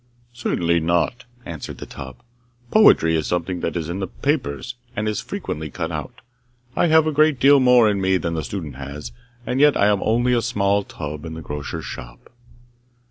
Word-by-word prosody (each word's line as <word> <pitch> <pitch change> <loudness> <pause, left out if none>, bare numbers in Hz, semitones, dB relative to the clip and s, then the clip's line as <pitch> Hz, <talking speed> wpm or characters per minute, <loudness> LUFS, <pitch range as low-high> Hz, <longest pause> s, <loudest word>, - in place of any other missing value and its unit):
'Certainly 85 -8 0
not!' 85 +10 0 0.2
answered 80 -4 -7
the - - -8
tub. 65 -2 -9 0.6
'Poetry 80 - +6
is 80 - -1
something 90 +1 -2
that 85 - -3
is 80 -3 -2
in 85 +3 -4
the 95 - -2
papers, 125 - -2 0.2
and 105 - -2
that 110 - +1
is 105 - -3
frequently 80 0 -5
cut - - -4
out. - - -6 0.5
I - - +3
have 160 -1 +5
a 155 - +1
great 155 -2 +3
deal 140 +2 +6
more 125 -3 +6
in 100 -2 +1
me 95 0 +3
than 85 -2 -3
the 80 -1 -2
student 75 -6 -6
has, 70 -1 -7 0.3
and 125 - -1
yet 150 0 +5
I - - +4
am 100 -2 +2
only 120 +3 +2
a 120 - +2
small 100 -3 +1
tub 75 -4 -7
in 80 -1 -6
the 80 - -7
grocer's 75 -1 -5
shop. - - -10
95 Hz, 195 wpm, -22 LUFS, 80-120 Hz, 0.6 s, Poetry